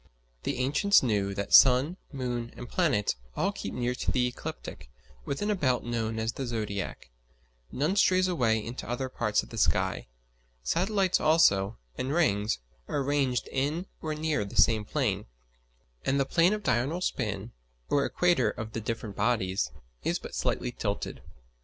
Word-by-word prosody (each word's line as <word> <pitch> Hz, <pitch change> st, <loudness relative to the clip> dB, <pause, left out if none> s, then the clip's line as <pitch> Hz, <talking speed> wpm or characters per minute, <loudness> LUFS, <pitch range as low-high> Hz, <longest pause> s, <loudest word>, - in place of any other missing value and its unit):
The -, -, -2 dB
ancients 145 Hz, +11 st, +4 dB
knew 100 Hz, -5 st, 0 dB
that 100 Hz, 0 st, -3 dB
sun 135 Hz, +6 st, +7 dB, 0.2 s
moon 125 Hz, -4 st, -3 dB
and 120 Hz, -, -7 dB
planets 125 Hz, -, +1 dB, 0.2 s
all -, -, +1 dB
keep -, -, -6 dB
near 125 Hz, 0 st, -1 dB
to 125 Hz, -, -4 dB
the 125 Hz, -1 st, +2 dB
ecliptic, 65 Hz, -, -6 dB, 0.4 s
within 205 Hz, +9 st, -1 dB
a -, -, +2 dB
belt 130 Hz, -9 st, +1 dB
known 115 Hz, -2 st, -2 dB
as 110 Hz, +1 st, -1 dB
the 135 Hz, -, -4 dB
zodiac: 105 Hz, -, -4 dB, 0.6 s
none 155 Hz, +8 st, 0 dB
strays 185 Hz, -2 st, +4 dB
away 115 Hz, -, +1 dB
into 120 Hz, +1 st, -6 dB
other 130 Hz, +2 st, -2 dB
parts -, -, 0 dB
of -, -, -13 dB
the -, -, -5 dB
sky. -, -, +1 dB, 0.6 s
Satellites 190 Hz, -, +2 dB
also, 115 Hz, -11 st, +4 dB, 0.2 s
and 130 Hz, +2 st, -1 dB
rings, 105 Hz, -, +2 dB, 0.3 s
are -, -, -2 dB
arranged 140 Hz, -3 st, 0 dB
in 145 Hz, +7 st, -1 dB, 0.2 s
or 155 Hz, -1 st, -2 dB
near 155 Hz, -6 st, 0 dB
the 100 Hz, -, -8 dB
same 110 Hz, -2 st, +4 dB
plane; 105 Hz, -7 st, -1 dB, 0.8 s
and 140 Hz, -, +1 dB
the 135 Hz, -, +2 dB
plane 170 Hz, +7 st, +3 dB
of 210 Hz, -1 st, -3 dB
diurnal 140 Hz, -, +1 dB
spin, 110 Hz, -, -2 dB, 0.4 s
or 140 Hz, -1 st, +2 dB
equator 175 Hz, -11 st, +2 dB
of 110 Hz, +1 st, -6 dB
the 115 Hz, -, -3 dB
different 110 Hz, -2 st, -4 dB
bodies, 95 Hz, -, +1 dB, 0.3 s
is -, -, +1 dB
but -, -, -9 dB
slightly 125 Hz, -, -1 dB
tilted. 105 Hz, -4 st, -3 dB
125 Hz, 160 wpm, -29 LUFS, 110-155 Hz, 0.8 s, sun